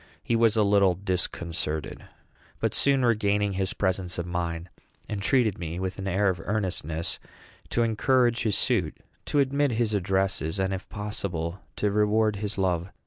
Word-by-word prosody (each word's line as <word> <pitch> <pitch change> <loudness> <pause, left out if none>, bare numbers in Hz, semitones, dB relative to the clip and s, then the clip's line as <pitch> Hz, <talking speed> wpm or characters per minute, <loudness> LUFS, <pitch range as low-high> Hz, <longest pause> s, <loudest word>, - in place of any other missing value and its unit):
He 115 - +1
was 115 -1 +3
a 110 - +5
little 100 -3 +4
disconcerted, 85 -4 -3 0.5
but, - - 0
soon 135 -2 +3
regaining 105 -3 +2
his 95 0 -1
presence 95 -2 -1
of 85 - -2
mind, 85 -1 -3 0.4
entreated 105 +1 +1
me, 85 0 -4
with 95 +1 -3
an 95 - -4
air 95 +2 +2
of 90 -3 -2
earnestness, 90 -6 -2 0.5
to 120 - +2
encourage 120 +1 +2
his 105 -5 +1
suit, - - 0 0.3
to - - 0
admit 140 -1 +2
his 110 -1 0
addresses, 95 -3 0
and, 95 0 0
if 95 - -6
possible, 95 -5 -3 0.2
to 105 - 0
reward 105 +1 +2
his 105 +1 -4
love. 90 -2 0
100 Hz, 155 wpm, -27 LUFS, 90-110 Hz, 0.5 s, a